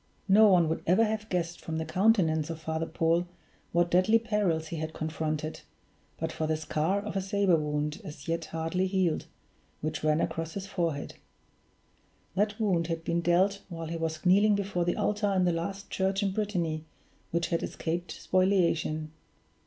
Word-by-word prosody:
No 210 +2 +7
one 180 -4 +5
would 160 - -1
ever 185 +7 +5
have 215 0 -3
guessed 175 -1 -2
from 160 -1 -4
the 160 - -2
countenance 165 -3 +2
of 165 -1 -5
Father 160 +1 -2
Paul 170 +2 +1 0.4
what 175 0 +2
deadly 185 +6 +5
perils 205 -9 0
he 165 - -4
had 155 0 -4
confronted, 155 0 -3 0.6
but 160 0 -2
for 160 - -2
the 155 0 +1
scar 155 +5 0
of 205 0 -6
a 195 - +1
saber 195 -2 +2
wound, 150 -1 -2
as 145 -2 -9
yet 165 0 -1
hardly 165 +4 -1
healed, 185 -4 0 0.5
which 155 +1 -3
ran 155 0 +3
across 165 -1 -2
his 195 -1 -4
forehead. 170 -7 -2 1.2
That 205 +3 0
wound 180 -6 +1
had 165 -1 -3
been 170 +1 0
dealt 185 +4 +2
while 165 -2 -6
he 165 - -3
was 160 0 -3
kneeling 205 +3 +5
before 195 -3 -1
the 175 - 0
altar 210 -1 +1
in 185 -1 +3
the 175 - +2
last 195 +4 -4
church 195 +1 0
in 195 - +1
Brittany 180 -7 -1 0.5
which 170 0 -1
had 170 - 0
escaped 170 +2 -3
spoliation. 170 -5 +1
170 Hz, 175 wpm, -29 LUFS, 160-195 Hz, 1.2 s, No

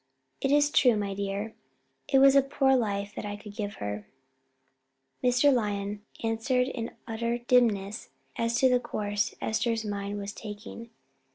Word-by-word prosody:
"It 270 - +1
is 290 0 +4
true, 245 -7 +5
my 200 -1 -2
dear; 200 +2 -3 0.5
it 270 - +3
was 275 0 +7
a 275 - +8
poor 270 -1 +2
life 205 -4 -1
that - - -6
I 205 0 -4
could 205 0 -11
give 205 -2 -4
her." 105 0 -5 1.2
Mr. 250 +3 +4
Lyon 205 -3 -1 0.2
answered 250 +3 +1
in 235 -3 -5
utter 235 +1 -1
dimness 230 -4 +1 0.3
as 230 0 0
to 260 - +6
the 250 -1 +4
course 205 -3 -2
Esther's 225 0 0
mind 205 0 -3
was 200 0 -5
taking. 220 +2 -9
225 Hz, 155 wpm, -28 LUFS, 205-250 Hz, 1.2 s, a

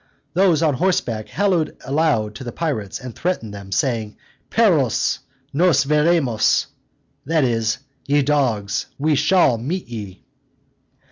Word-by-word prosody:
Those 175 -3 +3
on 155 -3 +3
horseback 125 - 0
hallooed 185 -6 0
aloud 135 -7 +1
to 120 - -8
the 120 - -5
pirates, 125 - -3
and 125 -2 -8
threatened 165 - -2
them, 100 -1 -9
saying, 110 -1 -1 0.3
"Perros! 165 - +2 0.3
nos 165 -1 +4
veremos," 150 -6 +2 0.6
that 155 +1 +1
is, 115 -3 0 0.3
"Ye 145 0 +3
dogs! 125 -8 0
we 155 +2 +1
shall 150 -4 +3
meet 170 +10 -3
ye." 105 -5 -8
140 Hz, 125 wpm, -21 LUFS, 115-165 Hz, 0.6 s, nos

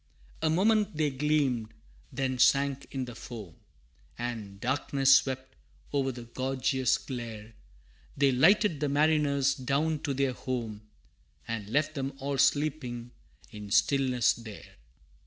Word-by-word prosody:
A 160 - +2
moment 205 +1 +2
they 150 -2 +1
gleamed, 135 -5 0 0.4
then 130 0 -2
sank 140 +1 +3
in 130 -2 -3
the 120 - -8
foam, 110 -8 -9 0.6
And 110 -5 -5
darkness 135 +2 +3
swept 130 -1 0 0.4
over 135 -2 +1
the 120 -1 -9
gorgeous 130 +1 0
glare 115 -4 -7 0.6
They 140 -1 +4
lighted 170 - +4
the 145 -1 0
mariners 145 -2 +2
down 145 +4 0
to 140 -2 -3
their 135 -1 +1
home, 115 -5 -5 0.6
And 110 -3 -4
left 150 +5 +1
them 135 -2 -3
all 140 0 -3
sleeping 130 -6 0 0.4
in 105 -1 -9
stillness 125 +3 +3
there! 110 -3 -11
135 Hz, 125 wpm, -29 LUFS, 120-145 Hz, 0.6 s, They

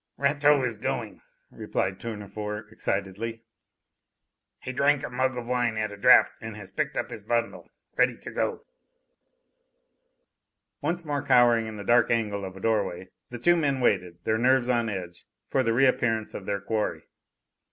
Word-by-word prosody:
"Rateau 140 0 +3
is 120 -4 -2
going," - - -4 0.3
replied 95 0 -2
Tournefort 105 -1 -6
excitedly. 110 +3 -3 1.2
"He 130 - -6
drank 140 +2 +2
a - - -5
mug 130 +1 0
of 120 -1 -5
wine 120 -3 0
at 110 -1 -1
a - - -7
draught 125 +5 +6
and 110 -1 -7
has 100 -3 -10
picked - - -2
up - - -2
his 110 - -7
bundle, 115 +2 -2 0.3
ready - - +2
to - - -9
go." - - -2 2.2
Once 170 +3 -2
more 145 -2 -1
cowering 120 -4 +4
in 110 - -7
the 105 - -7
dark 120 +2 +4
angle 105 -4 0
of 95 0 -8
a - - -9
doorway, 95 -4 -1 0.2
the 120 - -6
two 175 +9 +4
men 140 -5 +1
waited, 90 -8 +1
their 110 0 +1
nerves 125 0 +3
on 120 -2 +1
edge, 90 -3 -7 0.2
for 135 - +1
the 115 -3 +1
reappearance 120 -3 +2
of 95 - -7
their 100 -1 -1
quarry. 105 +1 -2
115 Hz, 165 wpm, -27 LUFS, 105-125 Hz, 2.2 s, draught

